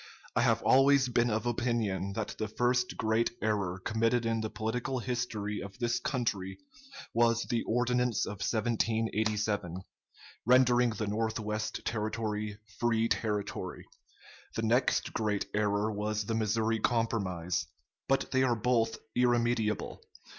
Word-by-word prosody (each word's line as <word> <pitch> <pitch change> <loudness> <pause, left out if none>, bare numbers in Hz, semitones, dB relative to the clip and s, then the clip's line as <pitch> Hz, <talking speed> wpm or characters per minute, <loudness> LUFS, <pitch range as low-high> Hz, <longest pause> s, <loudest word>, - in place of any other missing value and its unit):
I - - +3
have - - +2
always 135 0 +5
been 120 0 +2
of 110 +1 -1
opinion 115 -5 -1
that 110 0 -3
the 110 - -1
first 125 +3 0
great 110 +1 +2
error 100 -4 0
committed 115 +4 +1
in 115 -1 0
the 110 - -2
political 115 +4 -2
history 120 -4 -2
of 100 0 -9
this 120 -1 0
country 100 -8 -2 0.6
was 115 0 +3
the 120 -2 -1
Ordinance 125 -1 +1
of 105 - -6
1787, 110 -4 0 0.6
rendering 125 0 +5
the 110 -1 -3
North 110 +2 -1
west 110 0 -3
Territory 105 -1 -2 0.2
free 115 -1 +2
territory. 105 -3 -2 0.7
The 115 - -1
next 120 +3 +2
great 105 -2 0
error 105 +1 +1
was 105 0 -2
the 115 - -2
Missouri 110 0 +1
Compromise. 100 -8 0 0.4
But 135 - +1
they 130 - +3
are 125 -2 +3
both 115 0 +1 0.2
irremediable.... 120 -3 +1
110 Hz, 130 wpm, -31 LUFS, 105-120 Hz, 0.7 s, always